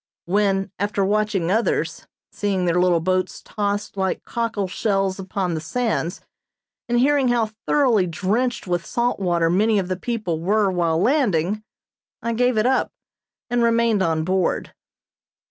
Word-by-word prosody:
When, 195 0 +1
after 200 0 0
watching 205 -4 0
others, 225 +3 0 0.2
seeing 195 -3 -1
their 175 +1 +2
little 175 -2 +3
boats 185 +1 -1
tossed 205 -1 -2
like 190 -1 -1
cockle 230 -4 -2
shells 195 0 -1
upon 185 -1 -2
the 160 - -3
sands, 205 -2 -2 0.7
and 240 0 +2
hearing 275 +1 +3
how 235 -3 +1 0.2
thoroughly 240 -10 +3
drenched 210 +9 -1
with 175 -2 -1
salt 240 +3 -1
water 175 -3 +1
many 210 +6 +3
of 190 -2 -1
the 185 - 0
people 185 -5 -3
were 200 +3 +2
while 170 -3 +1
landing, 210 - +1 0.6
I 235 - -2
gave 245 0 +2
it 215 - +2
up, 260 +1 +2 0.6
and 245 0 0
remained 230 -3 +3
on 160 -3 +1
board. 185 +1 0
200 Hz, 145 wpm, -22 LUFS, 180-230 Hz, 0.7 s, little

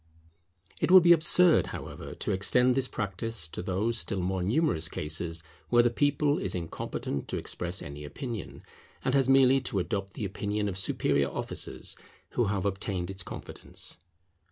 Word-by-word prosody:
It - - +2
would 185 -1 +9
be 175 - +7
absurd, 170 +1 +4
however, - - -7
to - - -2
extend 125 +6 +3
this 130 0 +1
practice 105 -3 -3
to - - -5
those 100 +6 -1
still 100 -3 -1
more 95 +1 -1
numerous 95 - +1
cases 80 +1 -3 0.3
where 120 0 +5
the 120 - +3
people 145 +3 +2
is 95 - -2
incompetent 80 -4 -4
to - - -2
express 90 +2 -3
any 70 +1 -8
opinion, 115 - -6 0.4
and 130 - +2
has 135 -2 +3
merely 135 0 +6
to 115 - -2
adopt 95 +1 -2
the 110 - -4
opinion 105 +1 -2
of 95 - -3
superior - - +1
officers - - -2 0.4
who 120 - +1
have 100 -2 -1
obtained 95 -2 -2
its 95 -1 -6
confidence. - - -6
100 Hz, 160 wpm, -29 LUFS, 90-130 Hz, 0.4 s, would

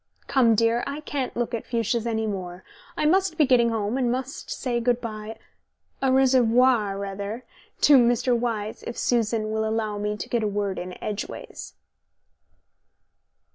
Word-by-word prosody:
Come, 235 -4 +3
dear, 230 +2 +2
I 285 +2 -4
can't 280 -5 -4
look 240 0 -2
at 230 - -2
fuchsias 235 0 -1
any 220 -1 -1
more. 185 -3 -5 0.3
I - - 0
must 370 +1 +2
be 305 - +5
getting 245 -3 +4
home 225 +2 -1
and 245 -2 +1
must 260 +2 -4
say 240 -2 -2
good 240 0 +1
bye 215 -2 -6 0.6
au 265 -1 +2
reservoir, 250 -5 +3
rather 200 +4 -5 0.4
to 285 - +7
Mr. 240 +1 +3
Wyse, 225 -3 -2
if 235 - -6
Susan 225 -2 0
will 220 0 0
allow 220 -1 -1
me 210 0 -2
to - - -6
get 235 - 0
a 215 - 0
word 200 -1 -2
in 180 0 -7
edgeways." 210 -1 -6
230 Hz, 160 wpm, -25 LUFS, 215-250 Hz, 0.6 s, to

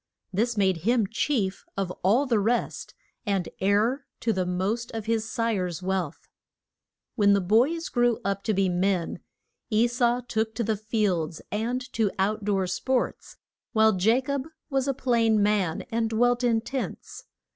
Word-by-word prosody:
This 225 +4 0
made 190 -3 +3
him 225 +6 +2
chief 215 -2 -1
of 195 -2 -1
all 225 +10 +3
the 235 -5 +2
rest, 230 +4 -1 0.3
and 195 -6 -1
heir 215 +8 +1
to 225 - +1
the 185 -2 -1
most 195 +6 -1
of 220 -2 -4
his 225 0 -1
sire's 195 -8 -1
wealth. 185 -5 -2 0.9
When 205 -3 +4
the 200 - +4
boys 245 - +2
grew 240 -2 +2
up 200 0 -1
to 220 - +1
be 195 0 +2
men, 180 -1 0 0.5
E 220 0 +3
sau 240 0 +1
took 220 -2 -2
to 235 - -1
the 220 0 0
fields 200 -7 -1
and 235 +4 -1
to 220 -3 +2
out 205 +2 0
door 195 -2 +1
sports, 255 +7 -2 0.4
while 220 -2 +4
Ja 220 +8 +3
cob 280 +1 -3 0.2
was 270 0 +1
a 275 - 0
plain 230 -5 +2
man 200 -6 +1
and 225 0 0
dwelt 245 +2 +2
in 230 -2 +2
tents. 265 +3 -6
220 Hz, 160 wpm, -26 LUFS, 195-240 Hz, 0.9 s, When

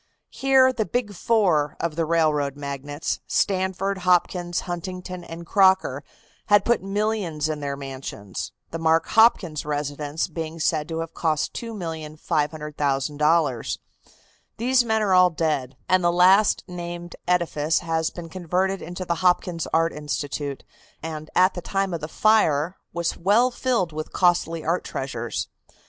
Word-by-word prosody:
Here 265 -1 +4
the 220 -4 -1
"big 240 -4 -2
four" 180 -8 +1
of 170 -2 -2
the 165 0 0
railroad 155 -4 +1
magnates 145 +1 -4
Stanford, 190 0 0
Hopkins, 180 -1 +1
Huntington 180 0 -6
and 170 0 -9
Crocker 190 -7 +3 0.4
had 205 0 +5
put 235 -1 +2
millions 195 -6 -1
in 155 -1 -3
their 140 -1 -3
mansions, 130 -8 -6 0.2
the 165 - -4
Mark 165 0 +2
Hopkins 215 -9 +4
residence 145 +1 -2
being 165 0 -6
said 155 -1 0
to 165 0 -2
have 165 0 -6
cost 155 -3 0
$2,500,000. 150 - -1 0.8
These 250 +2 +3
men 220 -2 +1
are 195 -3 +2
all 180 0 +6
dead, 150 -6 -2
and 185 -1 +3
the 175 - +4
last 185 +4 +5
named 175 -1 -7
edifice 165 -3 +1
has 165 -1 0
been 175 -2 -8
converted 185 +2 -1
into 175 +2 -6
the 170 - 0
Hopkins 180 -2 +1
Art 165 +1 +2
Institute, 145 -1 -4 0.4
and 155 -1 -6
at 185 +1 +5
the 175 - -5
time 195 +1 -1
of 165 - -3
the 155 - -4
fire 175 -4 +2 0.2
was 170 0 -2
well 215 +8 +3
filled 240 -10 0
with 155 0 -5
costly 170 -2 +1
art 170 +3 0
treasures. 120 -4 -4
170 Hz, 140 wpm, -24 LUFS, 150-190 Hz, 0.8 s, all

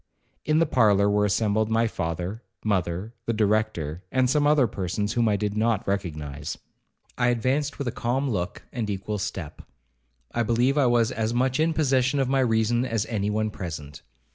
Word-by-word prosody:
In 155 0 +2
the 165 - +4
parlour 105 -7 +4
were 105 0 +3
assembled 110 +1 +1
my 115 +1 +2
father, 90 +1 -3 0.2
mother, 95 +1 -1
the 115 - +1
Director, 105 -7 0
and 130 -1 +3
some 145 +3 +2
other 150 -3 +5
persons 100 0 -2
whom 115 -2 +2
I 105 - +2
did 105 +1 -2
not 110 -1 +1
recognize. 75 -6 -3 0.6
I 125 - +3
advanced 130 +5 0
with 140 - -3
a - - 0
calm 130 +5 -1
look, 90 -8 -3
and 115 -4 -2
equal 100 +1 -3
step. 90 -4 -5 0.7
I 120 - 0
believe 120 +4 +2
I 140 -4 +4
was 120 0 +3
as 115 -1 -1
much 130 +2 +1
in 160 +1 +2
possession 135 -2 +2
of 135 - +1
my 135 +1 +2
reason 120 -1 +2
as 115 -4 -1
any 105 -2 0
one 110 0 0
present. 75 -6 -7
110 Hz, 180 wpm, -25 LUFS, 100-125 Hz, 0.7 s, other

